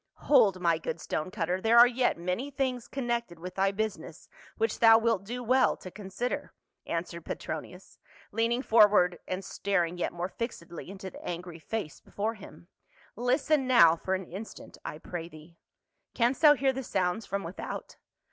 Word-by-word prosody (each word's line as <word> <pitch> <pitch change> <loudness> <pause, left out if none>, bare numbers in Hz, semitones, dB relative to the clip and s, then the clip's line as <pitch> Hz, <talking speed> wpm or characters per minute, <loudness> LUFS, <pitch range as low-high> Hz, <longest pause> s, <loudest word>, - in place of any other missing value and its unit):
" - - -55 0.2
Hold, 220 -10 +5
my 170 -2 +2
good 165 - -4
stone 155 +2 -3
cutter, 185 -1 -2
there 225 +2 +4
are 240 - +11
yet 245 -3 +1
many 180 +11 -2
things 260 -3 -2
connected 235 -8 -3
with 180 +2 -8
thy 195 +1 +2
business 195 -6 -5 0.3
which 225 -1 0
thou 225 -1 +8
wilt 225 -4 +1
do 245 +4 -5
well 255 +3 +3
to 185 - -10
consider," 210 +5 -4 0.3
answered 170 0 -4
Petronius, 180 +5 -7 0.3
leaning 230 +4 0
forward 205 -7 +5
and 185 0 -4
staring 180 -4 -1
yet - - -1
more 175 +1 -3
fixedh" 190 -6 -6
into 190 0 -8
the - - -12
angry 175 -1 -6
face 200 -2 -5
before 215 +3 -3
him. 175 -6 -13 0.3
" - - -28
Listen 260 +4 +1
now 170 -11 +7
for 190 +3 -2
an 190 0 -5
instant. 195 +6 -9
I - - -6
pray 165 +1 -6
thee. 160 +1 -15 0.6
Canst 245 +2 +1
thou 300 -2 +8
hear 270 0 +1
the 265 - -4
sounds 190 -2 -1
from 200 0 -2
without 170 +3 -7
195 Hz, 175 wpm, -29 LUFS, 175-235 Hz, 0.6 s, are